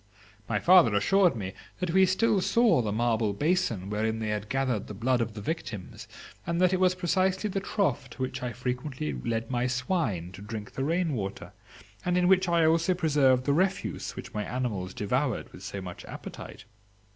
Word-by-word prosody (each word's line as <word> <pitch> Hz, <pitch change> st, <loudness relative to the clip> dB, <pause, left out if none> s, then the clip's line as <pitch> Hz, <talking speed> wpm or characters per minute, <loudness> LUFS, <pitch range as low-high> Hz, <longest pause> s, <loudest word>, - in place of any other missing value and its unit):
My 110 Hz, -, +1 dB
father 170 Hz, -, +6 dB
assured 180 Hz, -, +4 dB
me 95 Hz, -4 st, -5 dB, 0.2 s
that 180 Hz, -3 st, -2 dB
we 190 Hz, +1 st, +5 dB
still 195 Hz, +2 st, +2 dB
saw 230 Hz, -, +4 dB
the 105 Hz, -3 st, -2 dB
marble 110 Hz, -1 st, +1 dB
basin 145 Hz, -, 0 dB
wherein 110 Hz, +2 st, -1 dB
they 110 Hz, -1 st, -3 dB
had 105 Hz, 0 st, -3 dB
gathered 130 Hz, -6 st, -1 dB
the 105 Hz, -, -7 dB
blood 120 Hz, +4 st, +1 dB
of 110 Hz, -2 st, -3 dB
the 105 Hz, -, -6 dB
victims, 115 Hz, -, -5 dB, 0.4 s
and 170 Hz, 0 st, 0 dB
that 185 Hz, 0 st, +4 dB
it 185 Hz, -, +1 dB
was 185 Hz, -1 st, +3 dB
precisely 185 Hz, +3 st, 0 dB
the 195 Hz, -, -1 dB
trough 175 Hz, -, -1 dB
to 120 Hz, -, -10 dB
which 130 Hz, +1 st, -4 dB
I 125 Hz, -1 st, -3 dB
frequently 125 Hz, -, -3 dB
led 115 Hz, -, -3 dB
my 125 Hz, 0 st, +1 dB
swine 125 Hz, -, -1 dB
to 95 Hz, -, -11 dB
drink 105 Hz, 0 st, -7 dB
the 135 Hz, -, -3 dB
rain 165 Hz, +2 st, 0 dB
water, 100 Hz, -5 st, -5 dB, 0.5 s
and 180 Hz, 0 st, +1 dB
in 180 Hz, 0 st, +3 dB
which 190 Hz, -1 st, +4 dB
I 170 Hz, -1 st, +4 dB
also 165 Hz, +3 st, +3 dB
preserved 145 Hz, -7 st, +3 dB
the 140 Hz, -, +2 dB
refuse 190 Hz, +5 st, -1 dB
which -, -, -8 dB
my 105 Hz, -, -2 dB
animals 105 Hz, -7 st, -3 dB
devoured 125 Hz, +4 st, -1 dB
with -, -, -11 dB
so 100 Hz, -, -6 dB
much 90 Hz, -1 st, -8 dB
appetite. -, -, -9 dB
130 Hz, 190 wpm, -28 LUFS, 105-180 Hz, 0.5 s, father